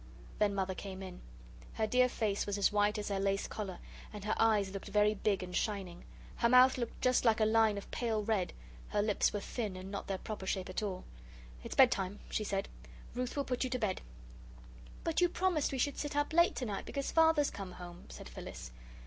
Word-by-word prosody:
Then 205 Hz, -1 st, +2 dB
Mother 190 Hz, -1 st, 0 dB
came 190 Hz, 0 st, -7 dB
in. 185 Hz, -1 st, -8 dB, 0.5 s
Her 220 Hz, -, 0 dB
dear 250 Hz, +3 st, +4 dB
face 210 Hz, -5 st, -1 dB
was 205 Hz, 0 st, -1 dB
as 200 Hz, -, +3 dB
white 210 Hz, +1 st, +2 dB
as 210 Hz, 0 st, -3 dB
her 200 Hz, -1 st, -1 dB
lace 195 Hz, 0 st, +1 dB
collar, 195 Hz, -4 st, -5 dB, 0.3 s
and 210 Hz, -2 st, -8 dB
her 215 Hz, -, +1 dB
eyes 210 Hz, -4 st, +3 dB
looked 195 Hz, +1 st, -6 dB
very 210 Hz, +1 st, +3 dB
big 200 Hz, -2 st, 0 dB
and 180 Hz, 0 st, -6 dB
shining. 190 Hz, -5 st, -2 dB, 0.3 s
Her 235 Hz, -, +3 dB
mouth 255 Hz, +1 st, +7 dB
looked 235 Hz, -2 st, -2 dB
like -, -, -17 dB
just 255 Hz, 0 st, +3 dB
a 220 Hz, -1 st, +4 dB
line 220 Hz, -1 st, +4 dB
of 200 Hz, -, -8 dB
pale 225 Hz, -3 st, -1 dB
red 205 Hz, -4 st, 0 dB, 0.4 s
her 205 Hz, -, +1 dB
lips 210 Hz, -1 st, +2 dB
were 205 Hz, -, -3 dB
thin 210 Hz, -3 st, -3 dB
and 185 Hz, +1 st, -7 dB
not 200 Hz, -, -5 dB
their 195 Hz, -, -1 dB
proper 200 Hz, -1 st, -6 dB
shape 185 Hz, -1 st, -1 dB
at 185 Hz, -, -2 dB
all. 190 Hz, -3 st, -3 dB, 0.6 s
"It's -, -, -6 dB
bedtime," 205 Hz, -6 st, +4 dB
she 215 Hz, -, 0 dB
said. 195 Hz, -1 st, -1 dB, 0.5 s
"Ruth 250 Hz, +3 st, -3 dB
will 280 Hz, -, +1 dB
put 250 Hz, 0 st, -1 dB
you 255 Hz, -, -1 dB
to 255 Hz, -, -1 dB
bed." 210 Hz, -6 st, -1 dB, 1.0 s
"But 330 Hz, +1 st, 0 dB
you 355 Hz, -, +5 dB
promised 350 Hz, -4 st, +1 dB
we 270 Hz, -, -2 dB
should 280 Hz, +2 st, 0 dB
sit 295 Hz, -1 st, -3 dB
up 290 Hz, +2 st, 0 dB
late 340 Hz, +1 st, +5 dB
tonight 215 Hz, -6 st, -3 dB
because 275 Hz, -1 st, -3 dB
Father's 320 Hz, -3 st, +4 dB
come 190 Hz, -2 st, -7 dB
home," 175 Hz, -1 st, -10 dB
said -, -, -9 dB
Phyllis. -, -, -8 dB
210 Hz, 215 wpm, -33 LUFS, 195-250 Hz, 1.0 s, mouth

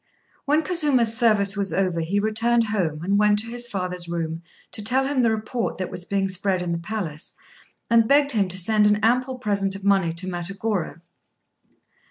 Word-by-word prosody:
When 300 Hz, +3 st, +2 dB
Kazuma's 290 Hz, -9 st, +2 dB
service 215 Hz, -4 st, +3 dB
was 200 Hz, -1 st, -2 dB
over, 185 Hz, -3 st, 0 dB
he 185 Hz, +5 st, -1 dB
returned 225 Hz, +3 st, +2 dB
home, 175 Hz, -8 st, -2 dB
and 200 Hz, +3 st, +1 dB
went 210 Hz, 0 st, +3 dB
to 225 Hz, +2 st, -2 dB
his 240 Hz, 0 st, -2 dB
father's 180 Hz, -4 st, -4 dB
room 165 Hz, -1 st, -4 dB, 0.3 s
to 210 Hz, -, -5 dB
tell 260 Hz, +5 st, +1 dB
him 275 Hz, -1 st, 0 dB
the 235 Hz, -, +3 dB
report 220 Hz, +2 st, -3 dB
that 185 Hz, -1 st, -4 dB
was 180 Hz, -, -6 dB
being 195 Hz, 0 st, -1 dB
spread 190 Hz, -1 st, -1 dB
in 175 Hz, -, -3 dB
the 170 Hz, -, -2 dB
palace, 170 Hz, -5 st, -6 dB, 0.5 s
and 230 Hz, -1 st, +3 dB
begged 285 Hz, +1 st, +4 dB
him 205 Hz, -6 st, +1 dB
to 185 Hz, +1 st, -3 dB
send 210 Hz, +3 st, +4 dB
an 210 Hz, -, +4 dB
ample 250 Hz, +3 st, +1 dB
present 200 Hz, -5 st, 0 dB
of 195 Hz, -, -8 dB
money 195 Hz, -4 st, +2 dB
to 170 Hz, +3 st, -1 dB
Matagorô. 185 Hz, -1 st, -3 dB
205 Hz, 190 wpm, -23 LUFS, 185-230 Hz, 0.5 s, begged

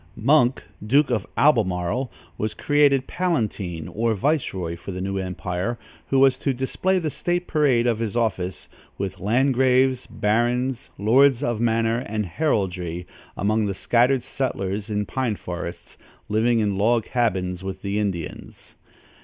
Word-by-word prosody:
Monk, 130 Hz, +1 st, +3 dB, 0.2 s
Duke 135 Hz, +6 st, +3 dB
of 110 Hz, -5 st, -1 dB
Albemarle, 115 Hz, -2 st, +2 dB, 0.2 s
was 110 Hz, 0 st, -3 dB
created 145 Hz, -2 st, +3 dB
palatine 110 Hz, -, -2 dB
or 115 Hz, +1 st, 0 dB
viceroy 95 Hz, -, -1 dB
for 85 Hz, +3 st, -8 dB
the 90 Hz, -, -5 dB
new 95 Hz, +1 st, -2 dB
empire, 90 Hz, +4 st, -3 dB, 0.3 s
who 135 Hz, -, +1 dB
was 135 Hz, -1 st, +5 dB
to 135 Hz, -2 st, 0 dB
display 180 Hz, +9 st, 0 dB
the 160 Hz, -4 st, -1 dB
state 175 Hz, +3 st, -1 dB
parade 140 Hz, -8 st, +2 dB
of 115 Hz, -2 st, +1 dB
his 115 Hz, -1 st, -3 dB
office, 95 Hz, -6 st, -1 dB, 0.3 s
with 95 Hz, -1 st, -4 dB
landgraves, 130 Hz, +3 st, +2 dB
barons, 120 Hz, +4 st, 0 dB
lords 130 Hz, +5 st, +4 dB
of 120 Hz, -4 st, -1 dB
manor 115 Hz, 0 st, +1 dB
and 110 Hz, -3 st, -3 dB
heraldry, 90 Hz, -, -1 dB, 0.3 s
among 105 Hz, +1 st, +1 dB
the 100 Hz, -, -3 dB
scattered 125 Hz, +5 st, +2 dB
settlers 105 Hz, -6 st, -3 dB
in 105 Hz, -1 st, -1 dB
pine 125 Hz, -3 st, -1 dB
forests, 85 Hz, -2 st, -7 dB, 0.3 s
living 115 Hz, +3 st, +2 dB
in 100 Hz, -2 st, 0 dB
log 115 Hz, +2 st, +2 dB
cabins 95 Hz, -7 st, -1 dB
with 95 Hz, -1 st, -6 dB
the 100 Hz, +1 st, -1 dB
Indians. 95 Hz, -6 st, -5 dB
115 Hz, 140 wpm, -23 LUFS, 95-130 Hz, 0.3 s, was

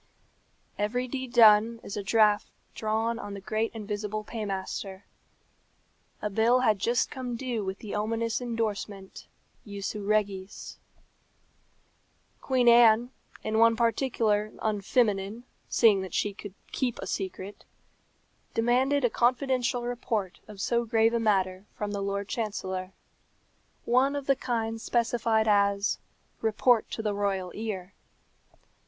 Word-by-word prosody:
Every 245 Hz, +5 st, -1 dB
deed 260 Hz, -1 st, -5 dB
done 225 Hz, 0 st, +6 dB
is -, -, -6 dB
a 205 Hz, -, -2 dB
draft 210 Hz, 0 st, +3 dB, 0.3 s
drawn 225 Hz, +2 st, -1 dB
on 205 Hz, -2 st, -6 dB
the -, -, -6 dB
great 215 Hz, +3 st, -2 dB
invisible 210 Hz, 0 st, -4 dB
paymaster. 195 Hz, -2 st, -5 dB, 1.2 s
A 210 Hz, -, 0 dB
bill 230 Hz, +5 st, +3 dB
had 215 Hz, -5 st, +2 dB
just 235 Hz, +4 st, +1 dB
come 250 Hz, -2 st, -4 dB
due 235 Hz, -3 st, -3 dB
with 190 Hz, 0 st, -4 dB
the 210 Hz, -1 st, -8 dB
ominous 225 Hz, +3 st, -1 dB
endorsement, 215 Hz, -4 st, -4 dB, 0.4 s
Jussu 200 Hz, 0 st, -5 dB
regis. 200 Hz, -2 st, -2 dB, 1.6 s
Queen 255 Hz, -2 st, +1 dB
Anne, 235 Hz, 0 st, +6 dB, 0.3 s
in 220 Hz, 0 st, 0 dB
one 230 Hz, 0 st, +6 dB
particular 225 Hz, -3 st, +1 dB
unfeminine, 210 Hz, 0 st, 0 dB, 0.3 s
seeing 210 Hz, -5 st, +4 dB
that 190 Hz, -3 st, -6 dB
she 205 Hz, -, 0 dB
could 200 Hz, -1 st, -10 dB, 0.2 s
keep 250 Hz, -3 st, -1 dB
a -, -, -6 dB
secret, 190 Hz, +1 st, -5 dB, 0.9 s
demanded 255 Hz, +4 st, +2 dB
a -, -, +3 dB
confidential 250 Hz, 0 st, +1 dB
report 230 Hz, -6 st, -3 dB
of 210 Hz, -2 st, -11 dB
so 235 Hz, +4 st, +1 dB
grave 225 Hz, 0 st, +2 dB
a 235 Hz, -, +2 dB
matter 195 Hz, -3 st, 0 dB
from 210 Hz, -1 st, -3 dB
the 200 Hz, -1 st, -3 dB
Lord 200 Hz, 0 st, -2 dB
Chancellor 190 Hz, -5 st, -3 dB, 0.9 s
one 260 Hz, +4 st, +3 dB
of 285 Hz, -1 st, -4 dB
the 275 Hz, -, +3 dB
kind 225 Hz, -3 st, -2 dB
specified 230 Hz, -2 st, +1 dB
as 200 Hz, -1 st, +2 dB, 0.4 s
"report 225 Hz, +1 st, +2 dB
to 220 Hz, -, -5 dB
the 210 Hz, -1 st, 0 dB
royal 195 Hz, -3 st, -1 dB
ear." 200 Hz, -4 st, -5 dB
220 Hz, 125 wpm, -28 LUFS, 200-235 Hz, 1.6 s, done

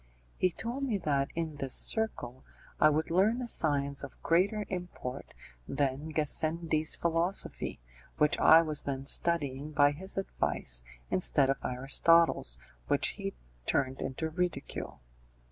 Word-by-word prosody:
He 185 Hz, -, +2 dB
told 235 Hz, +10 st, -5 dB
me 240 Hz, -7 st, 0 dB
that 140 Hz, -6 st, 0 dB
in 160 Hz, -3 st, -3 dB
this 135 Hz, -2 st, -4 dB
circle 130 Hz, -, -2 dB, 0.4 s
I 155 Hz, -, +6 dB
would 155 Hz, +2 st, -1 dB
learn 205 Hz, +7 st, +3 dB
a 250 Hz, -, -4 dB
science 140 Hz, -8 st, +2 dB
of -, -, -10 dB
greater 200 Hz, +5 st, +2 dB
import 175 Hz, -8 st, -6 dB, 0.4 s
than 140 Hz, +2 st, -2 dB
Gassendi's 155 Hz, +1 st, +1 dB
philosophy, 170 Hz, +3 st, -1 dB, 0.4 s
which 150 Hz, 0 st, +3 dB
I 165 Hz, +1 st, +7 dB
was 155 Hz, -2 st, -3 dB
then 135 Hz, -1 st, -3 dB
studying 145 Hz, -2 st, 0 dB
by 145 Hz, -1 st, +5 dB
his 190 Hz, +7 st, -6 dB
advice -, -, 0 dB, 0.3 s
instead 135 Hz, +9 st, +4 dB
of 135 Hz, -, -3 dB
Aristotle's, 135 Hz, -, +3 dB, 0.3 s
which -, -, +2 dB
he -, -, -6 dB, 0.3 s
turned 130 Hz, 0 st, 0 dB
into 150 Hz, +4 st, -3 dB
ridicule. 160 Hz, -, -4 dB
155 Hz, 130 wpm, -30 LUFS, 140-170 Hz, 0.4 s, I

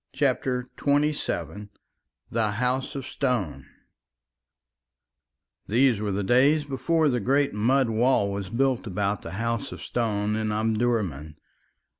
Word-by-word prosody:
CHAPTER 130 Hz, -2 st, 0 dB, 0.2 s
XXVII 140 Hz, -, 0 dB, 0.6 s
THE 110 Hz, -2 st, +1 dB
HOUSE 125 Hz, +5 st, -1 dB
OF 135 Hz, -2 st, -4 dB
STONE 125 Hz, -, -2 dB, 2.0 s
These 120 Hz, -1 st, +3 dB
were 105 Hz, -1 st, -1 dB
the 100 Hz, +1 st, -1 dB
days 140 Hz, +8 st, +4 dB
before 145 Hz, +4 st, +1 dB
the 125 Hz, -3 st, +1 dB
great 135 Hz, +5 st, +1 dB
mud 125 Hz, +5 st, +2 dB
wall 110 Hz, -3 st, +2 dB
was 100 Hz, -2 st, -4 dB
built 130 Hz, 0 st, 0 dB
about 100 Hz, 0 st, -1 dB
the 85 Hz, -, -8 dB
House 115 Hz, +2 st, -2 dB
of -, -, -8 dB
Stone 105 Hz, -3 st, -1 dB
in 110 Hz, -1 st, -1 dB
Omdurman. 105 Hz, -, -1 dB
115 Hz, 120 wpm, -26 LUFS, 105-135 Hz, 2.0 s, days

